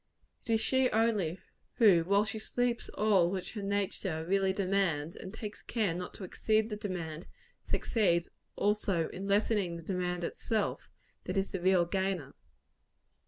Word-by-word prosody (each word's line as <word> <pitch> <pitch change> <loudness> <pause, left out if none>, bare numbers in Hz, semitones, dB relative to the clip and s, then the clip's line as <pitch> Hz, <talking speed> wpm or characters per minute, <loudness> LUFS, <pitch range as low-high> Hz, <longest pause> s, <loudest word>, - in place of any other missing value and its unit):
It - - -15
is 220 - +3
she 260 +2 +3
only, 215 -7 +1 0.4
who, 195 -8 +6
while 200 +4 +3
she 220 +1 -3
sleeps 245 +1 -1
all 195 -5 +4
which 185 0 -3
her 215 - -4
nature 195 -5 -2
really 195 +1 +2
demands, 185 -5 0
and 185 - -8
takes 210 -1 -7
care 215 -7 0
not 180 +1 -6
to - - -8
exceed 215 +4 +1
the - - -1
demand, 180 -6 -5 0.4
succeeds 175 -7 +1 0.2
also 200 -5 +1
in 190 +2 -6
lessening 200 -3 +2
the 165 - -9
demand 180 -1 -2
itself, 215 +4 -2 0.4
that 185 - -2
is 195 0 +1
the 190 - -3
real 185 -1 +4
gainer. 185 -6 -2
195 Hz, 155 wpm, -31 LUFS, 175-210 Hz, 0.4 s, who